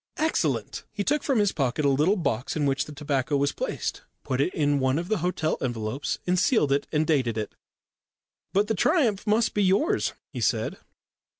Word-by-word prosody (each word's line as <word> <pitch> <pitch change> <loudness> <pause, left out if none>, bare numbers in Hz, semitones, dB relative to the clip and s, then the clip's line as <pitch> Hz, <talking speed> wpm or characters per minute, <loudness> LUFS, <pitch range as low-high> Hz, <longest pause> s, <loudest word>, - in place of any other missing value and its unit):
"Excellent." 315 +1 -1
He 205 -2 -3
took 295 +7 +1
from 270 -4 0
his 205 -2 +3
pocket 140 +1 -1
a - - +5
little 150 +9 +3
box 140 - -2
in 150 -2 0
which 135 0 +1
the - - -10
tobacco 145 -1 -1
was 140 0 +1
placed, - - -3 0.2
put 130 +1 -1
it 160 - +1
in 145 -4 +1
one 130 +1 +1
of 175 +2 -3
the 215 -3 +1
hotel 160 -2 -1
envelopes 120 +1 -2
and 180 0 +2
sealed 200 - +3
it 140 - +1
and 155 0 +1
dated 130 -8 +1
it. 105 -2 -3 1.0
"But 200 +2 +3
the 220 - +1
triumph 220 - +2
must 220 +2 +2
be 210 - +1
yours," 195 - +2 0.2
he - - -4
said. - - 0
150 Hz, 195 wpm, -26 LUFS, 135-200 Hz, 1.0 s, a